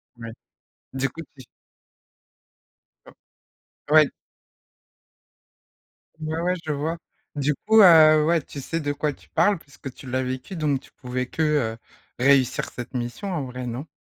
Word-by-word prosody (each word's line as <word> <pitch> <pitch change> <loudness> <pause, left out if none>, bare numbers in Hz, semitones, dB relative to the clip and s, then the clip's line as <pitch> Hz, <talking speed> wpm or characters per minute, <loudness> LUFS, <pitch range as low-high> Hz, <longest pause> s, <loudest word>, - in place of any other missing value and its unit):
Ouais. 115 -1 -8 0.6
Du 135 +1 -1
coup 165 - -9
tu 130 - -13 2.2
Un 150 - -6
ouais 155 -1 +8
d - - -10 2.1
Ouais, 155 +1 -3
ouais 180 +2 0
je 155 - -2
vois. 155 +4 -2 0.4
Du 145 +1 +1
coup, 220 0 +7
heu, 155 -4 +7
ouais, 165 0 +2
tu 140 - -10
sais 165 +5 -3
de 145 -2 -2
quoi 145 +1 -2
tu - - -22
parles 205 -3 +2
puisque 140 -3 -11
tu 130 - -11
l'as 130 +1 -1
vécu, 130 +7 -5
donc 150 -5 0
tu - - -20
pouvais 125 0 -4
que 160 - -4
heu, 145 -8 0 0.4
réussir 130 -1 +3
cette 125 +1 -8
mission 120 - -4
en 165 -6 -2
vrai, 125 -1 -6
non? 125 +6 -5
145 Hz, 155 wpm, -24 LUFS, 130-160 Hz, 2.2 s, ouais